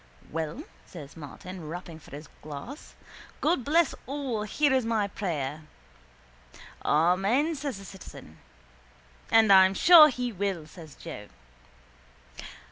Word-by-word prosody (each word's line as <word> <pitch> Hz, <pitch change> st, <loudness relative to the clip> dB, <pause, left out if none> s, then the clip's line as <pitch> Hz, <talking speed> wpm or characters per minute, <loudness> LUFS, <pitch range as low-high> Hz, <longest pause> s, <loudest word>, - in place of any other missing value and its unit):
—Well, 165 Hz, -, -4 dB, 0.2 s
says 150 Hz, -6 st, -11 dB
Martin, 165 Hz, +3 st, -9 dB
rapping 170 Hz, -1 st, -8 dB
for -, -, -17 dB
his 145 Hz, +2 st, -10 dB
glass. 155 Hz, -, -9 dB, 0.4 s
God 310 Hz, -4 st, +1 dB
bless 320 Hz, +3 st, +2 dB
all 270 Hz, -5 st, -3 dB
here 285 Hz, +6 st, +1 dB
is 260 Hz, -1 st, +2 dB
my 225 Hz, -3 st, 0 dB
prayer. 155 Hz, -7 st, -4 dB, 1.2 s
—Amen, 195 Hz, -, +2 dB
says 280 Hz, -6 st, -5 dB
the 195 Hz, -, -11 dB
citizen. 140 Hz, -, -12 dB, 0.9 s
—And 220 Hz, -3 st, +6 dB
I'm 190 Hz, 0 st, +6 dB
sure 330 Hz, -, +8 dB
He 250 Hz, -2 st, -3 dB
will, 195 Hz, -5 st, -3 dB
says 160 Hz, -1 st, -13 dB
Joe. 105 Hz, -, -9 dB
195 Hz, 120 wpm, -27 LUFS, 160-260 Hz, 1.2 s, sure